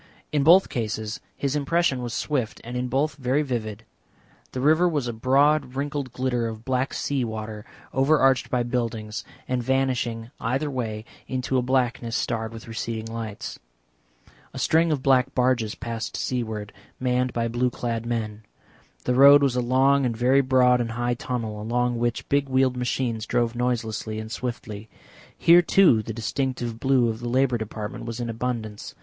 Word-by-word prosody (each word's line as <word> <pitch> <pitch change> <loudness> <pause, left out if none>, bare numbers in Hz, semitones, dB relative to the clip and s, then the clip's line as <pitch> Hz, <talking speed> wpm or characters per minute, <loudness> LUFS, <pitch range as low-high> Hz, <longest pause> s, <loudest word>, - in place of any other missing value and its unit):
In 150 -1 +2
both 175 +7 +6
cases 110 -2 -3 0.2
his 140 0 -1
impression 150 -2 +1
was 120 -1 -4
swift 130 -7 -2
and 120 +2 -7
in 125 0 -1
both 135 +3 0
very 135 +2 +1
vivid. 115 -5 -4 0.7
The 130 - -4
river 160 +6 +4
was 145 -6 -1
a 120 - -3
broad 135 +3 +2
wrinkled 140 -1 -3
glitter 125 -2 -1
of 110 0 -7
black 130 0 0
sea 140 -3 -1
water, 110 -1 -5 0.3
overarched 135 -1 +3
by 125 -1 +1
buildings, 115 -3 -3 0.2
and 125 -1 0
vanishing 120 -3 -1
either 135 +5 -1
way 110 -4 -4 0.2
into 130 0 -2
a - - +1
blackness 125 -2 0
starred 115 -3 -2
with 115 0 -10
receding 115 0 -4
lights. 110 -3 -6 1.0
A - - -6
string 165 +1 +3
of 140 -4 -1
black 135 -1 +3
barges 125 -4 +1
passed 115 -3 -5
seaward, 110 -5 -3 0.3
manned 125 0 +1
by 115 0 -1
blue 120 +2 0
clad 115 -1 -3
men. 110 -3 -3 0.6
The 125 - +1
road 140 +2 +8
was 135 -3 +2
a 125 - +1
long 135 +3 +3
and 120 -3 -1
very 130 +4 +4
broad 125 -2 +4
and 115 -1 -3
high 120 +1 0
tunnel, 115 -3 -4
along 120 +2 0
which 120 0 -1
big 140 -1 +1
wheeled 130 -1 +2
machines 120 -3 -2
drove 120 -1 +1
noiselessly 115 -3 -2
and 110 0 -6
swiftly. 115 -3 -5 0.5
Here, 170 +1 +7
too, 175 - +5
the 110 - -6
distinctive 120 +1 -3
blue 130 -1 +3
of 110 -1 -3
the 120 0 -4
Labour 125 -1 +2
Department 110 0 -6
was 115 0 -5
in 120 -1 -2
abundance. 115 -3 -4
125 Hz, 165 wpm, -25 LUFS, 115-130 Hz, 1.0 s, road